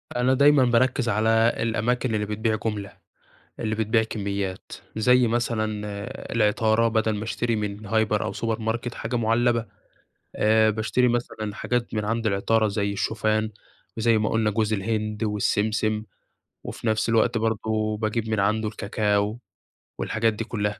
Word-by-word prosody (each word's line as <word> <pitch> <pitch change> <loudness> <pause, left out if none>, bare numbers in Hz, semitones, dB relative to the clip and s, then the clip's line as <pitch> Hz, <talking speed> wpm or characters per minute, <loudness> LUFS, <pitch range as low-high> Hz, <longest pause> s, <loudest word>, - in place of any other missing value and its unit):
أنا 125 +2 +2
دايمًا 140 0 +5
باركز 120 +1 +2
على 110 +2 +1 0.3
الأماكن 115 +1 0
اللي 105 - 0
بتبيع 110 +1 -1
جملة، 105 -2 -4 0.6
اللي 110 -1 -1
بتبيع 110 +1 +2
كميات، 100 -3 -4 0.2
زي 125 +2 +4
مثلًا 115 -1 0 0.7
العطارة، 110 +1 +2
بدل 110 -1 +1
ما 105 - -4
أشتري 115 +1 -1
من 105 0 -4
هايبر 110 0 +1
أو 95 - -3
سوبر 110 +2 -2
ماركت 115 +2 -3
حاجة 125 - -4
معلبة 115 0 +2 0.7
آآ، 110 0 +4
باشتري 115 +3 +1
مثلًا 110 -3 -2
حاجات 125 +2 -2
من 105 -1 -1
عند 115 +1 -1
العطارة 110 +2 +2
زي 100 0 -1
الشوفان 110 +1 0 0.5
وزي 115 0 +3
ما 105 - 0
قلنا 110 -1 +1
جوز 110 +1 0
الهند 110 +1 -1
والسمسم، 105 +1 0 0.6
وفي 115 - -6
نفس 110 +1 +1
الوقت 115 +1 +3
برضو 110 -1 -1
باجيب 110 +1 -2
من 110 -2 0
عنده 110 +2 +1
الكاكاو 105 +1 -1 0.6
والحاجات 110 0 0
دي 115 - -4
كلها. 105 -3 -3
110 Hz, 145 wpm, -25 LUFS, 105-115 Hz, 0.7 s, دايمًا